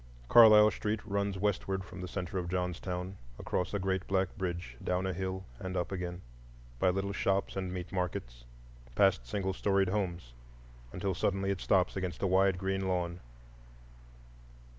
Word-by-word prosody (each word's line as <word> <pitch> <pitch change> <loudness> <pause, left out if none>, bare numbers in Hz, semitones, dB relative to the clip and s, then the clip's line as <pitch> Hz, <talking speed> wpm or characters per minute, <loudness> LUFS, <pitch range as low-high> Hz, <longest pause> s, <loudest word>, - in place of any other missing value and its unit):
Carlisle 110 -2 +9
Street 105 +3 -2
runs 100 -2 -1
westward 95 -1 -1
from 90 0 -9
the 90 - -4
centre 90 0 -3
of 85 -1 -4
Johnstown, 90 +1 -3 0.2
across 90 - -2
a 100 - 0
great 95 0 -1
black 95 -1 0
bridge, 85 - -4
down 90 +1 0
a 95 - -1
hill 95 +1 -4
and 95 0 -4
up 90 - -2
again, 90 -1 -4 0.6
by 90 - +4
little 95 +2 -1
shops 100 0 0
and 95 -2 -3
meat 90 -1 -5
markets, - - -3 0.5
past 95 -12 +3
single 95 +4 -1
storied 95 0 +2
homes, 90 -10 -2 0.6
until 95 +1 -2
suddenly 95 +3 0
it 95 - -3
stops 95 -2 +2
against 95 -1 -3
a - - +3
wide 95 0 +3
green 95 0 -1
lawn. 90 -1 -1
95 Hz, 160 wpm, -32 LUFS, 90-95 Hz, 0.6 s, Carlisle